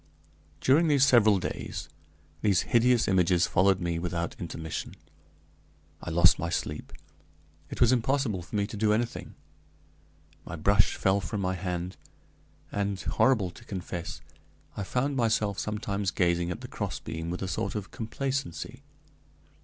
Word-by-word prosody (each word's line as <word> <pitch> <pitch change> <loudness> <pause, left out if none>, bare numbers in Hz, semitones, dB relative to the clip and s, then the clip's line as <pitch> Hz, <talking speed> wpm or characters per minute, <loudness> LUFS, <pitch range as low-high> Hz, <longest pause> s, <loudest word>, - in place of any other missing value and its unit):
During 150 +2 +4
several 120 -6 +6
days 90 - -4 0.5
these 100 -5 +3
hideous 120 0 +3
images 90 -2 +3
followed 95 0 +3
me 85 -2 -1
without 85 0 -3
intermission. 80 -2 -5 1.1
I - - -5
lost 85 -1 +5
my 85 +2 -2
sleep; 75 -2 -3 0.8
it - - -7
was 120 0 +6
impossible 125 -5 +1
for 85 - -8
me 100 -1 +2
to 105 - -7
do 105 0 +2
anything; 115 +2 -2 1.1
my 85 - -7
brush 100 +5 +3
fell 95 +1 +2
from 105 +2 -4
my 95 0 0
hand; 90 0 -4 0.7
and, 100 -1 -1
horrible 100 +2 +2
to - - -15
confess, 90 -3 -5 0.5
I - - -4
found 135 +7 -1
myself 110 -4 +1
sometimes 105 -2 -2
gazing 85 -2 +1
at 90 - -4
the - - -7
crossbeam 80 +1 -4
with 90 +2 -3
a - - -2
sort 90 - -2
of 105 -2 -5
complacency. 135 +2 -4
100 Hz, 140 wpm, -28 LUFS, 90-115 Hz, 1.1 s, several